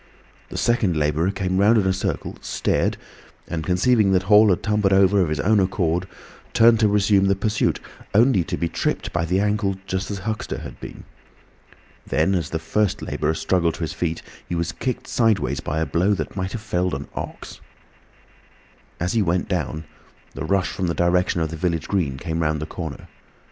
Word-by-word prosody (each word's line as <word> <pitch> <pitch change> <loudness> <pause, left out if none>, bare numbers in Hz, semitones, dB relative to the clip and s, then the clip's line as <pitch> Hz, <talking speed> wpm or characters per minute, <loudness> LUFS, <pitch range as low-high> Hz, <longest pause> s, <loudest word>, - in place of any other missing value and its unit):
The - - -6
second 105 -8 +1
labourer 75 +4 +1
came 95 -1 -1
round 105 +4 +5
in 100 - +2
a 95 - +2
circle, 95 - -3
stared, - - 0 0.5
and 80 -2 -3
conceiving 95 +4 +3
that 95 0 +2
Hall 105 +2 +6
had 90 - +1
tumbled 105 -2 +2
over 95 +1 +4
of 85 - +1
his 75 -1 -2
own 105 +7 +3
accord, 90 -2 0 0.5
turned 115 0 +6
to 110 - +4
resume 100 -1 +3
the 100 0 +3
pursuit, 105 +2 0 0.4
only 110 -4 +4
to 90 -3 -3
be 85 - -1
tripped - - -2
by 85 -1 0
the 90 +3 +1
ankle 105 -1 0
just 95 0 -3
as 100 - -3
Huxter 110 +2 -4
had - - -9
been. - - -9 1.0
Then, 95 - +1
as 85 -6 -1
the 80 - -2
first 95 +5 -1
labourer 80 +1 -1
struggled 85 -1 +1
to - - -10
his 80 - -2
feet, 80 -2 -3 0.3
he 90 - -2
was 85 0 -1
kicked 115 +9 -4
sideways 115 -4 +1
by 75 - -3
a 80 - +1
blow 95 +6 +1
that - - -5
might 95 0 -3
have 115 - -4
felled 90 -5 -1
an 70 +1 -6
ox. - - -7 1.4
As 90 +5 -1
he 115 - +2
went 90 -1 0
down, 80 -5 -2 0.5
the 70 - -5
rush 95 +3 +1
from 95 - -2
the 85 - -1
direction 85 +1 +1
of 80 -1 -1
the 80 - -5
village 85 -2 -1
green 80 -10 -1
came 80 +3 -3
round 75 -1 0
the 75 - -4
corner. 80 -3 -7
95 Hz, 195 wpm, -22 LUFS, 85-100 Hz, 1.4 s, Hall